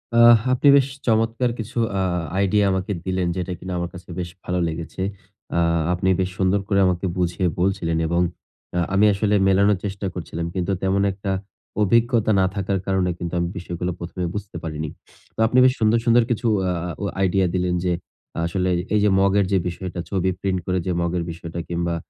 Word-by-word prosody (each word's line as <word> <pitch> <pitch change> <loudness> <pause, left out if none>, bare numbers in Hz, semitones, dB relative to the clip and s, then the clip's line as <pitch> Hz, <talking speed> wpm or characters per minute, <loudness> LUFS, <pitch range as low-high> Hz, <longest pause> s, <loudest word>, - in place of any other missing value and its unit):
আহ! 120 0 +8 0.2
আপনি 130 +3 +2
বেশ 135 -1 +3 0.2
চমৎকার 115 +2 +2
কিছু 115 +2 -6 0.2
আ - - +1 0.4
আইডিয়া 100 +1 +3
আমাকে 95 +2 -2
দিলেন, 95 -1 0
যেটা 90 0 -3
কিন্তু 95 0 -6
আমার 85 -1 -2
কাছে 90 0 -12
বেশ 90 -1 -3
ভালো 90 0 -1
লেগেছে। 80 +3 -5 0.6
আ - - +3 0.3
আপনি 90 +1 -1
বেশ 95 -1 +1
সুন্দর 95 +1 +2
করে 100 -1 +2
আমাকে 90 0 0
বুঝিয়ে 90 0 0
বলছিলেন 90 -3 0
এবং 85 +2 +1 0.6
আ - - +3
আমি 100 +2 +5
আসলে 105 +1 +1
মেলানোর 100 +1 +4
চেষ্টা 100 0 -4
করছিলাম। 85 -1 -5
কিন্তু 90 0 -1
তেমন 95 +1 +2
একটা 95 0 -4 0.5
অভিজ্ঞতা 115 +1 +3
না 95 - +4
থাকার 100 -1 -1
কারণে 95 -2 +1
কিন্তু 85 -1 -5
আমি 85 - 0
বিষয়গুলো 90 0 -3
১ম 85 +2 -8
এ - - -1
বুঝতে 105 -4 -5
পারিনি। 80 -1 -4 0.5
তো - - -13
আপনি 125 - +1
বেশ 130 - +5
সুন্দর, 110 +1 +4
সুন্দর 120 0 +5
কিছু 120 +1 0 0.2
আ - - +1 0.3
অ - - 0 0.2
আইডিয়া 95 0 +2
দিলেন 90 -1 0
যে 90 -1 +1 0.5
আসলে 90 +2 0 0.3
এইযে 105 0 +4
মগের 100 +1 +3
যে 95 - +4
বিষয়টা, 90 0 -5
ছবি 95 -1 0
প্রিন্ট 95 -1 -1
করে 90 0 0
যে 95 - 0
মগের 85 0 -1
বিষয়টা 85 0 -7
কিংবা 85 0 -1
95 Hz, 185 wpm, -22 LUFS, 90-100 Hz, 0.6 s, আহ